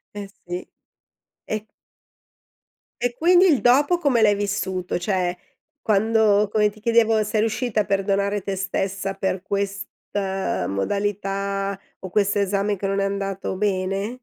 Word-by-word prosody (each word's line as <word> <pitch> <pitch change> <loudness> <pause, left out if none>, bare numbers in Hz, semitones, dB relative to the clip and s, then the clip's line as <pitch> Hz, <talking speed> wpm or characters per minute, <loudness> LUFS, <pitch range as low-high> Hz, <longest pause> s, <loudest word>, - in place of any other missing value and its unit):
Eh 200 -1 -5 0.2
sì. 175 +1 -5 0.8
E 215 0 -4 1.4
e 245 0 0
quindi 355 +4 +5
il 300 -8 +3
dopo 285 +8 +4
come 280 -9 +2
l'hai 205 -2 +5
vissuto? 190 -3 -2
Cioè, 180 -1 0 0.5
quando 215 0 +3
come 210 -1 +3
ti 215 +1 -16
chiedevo, 225 -1 +3
sei 210 +1 -1
riuscita 225 0 0
a - - -3
perdonare 200 +1 0
te 195 -1 -2
stessa 195 0 -2
per 190 -1 -2
questa 195 - -3
modalità 195 - -2 0.2
o 190 - -8
questo 205 0 +2
esame 200 +1 +1
che 195 +1 -5
non 195 0 0
è - - +1
andato 195 -1 -3
bene? 195 +3 -1
200 Hz, 135 wpm, -23 LUFS, 195-215 Hz, 1.4 s, quindi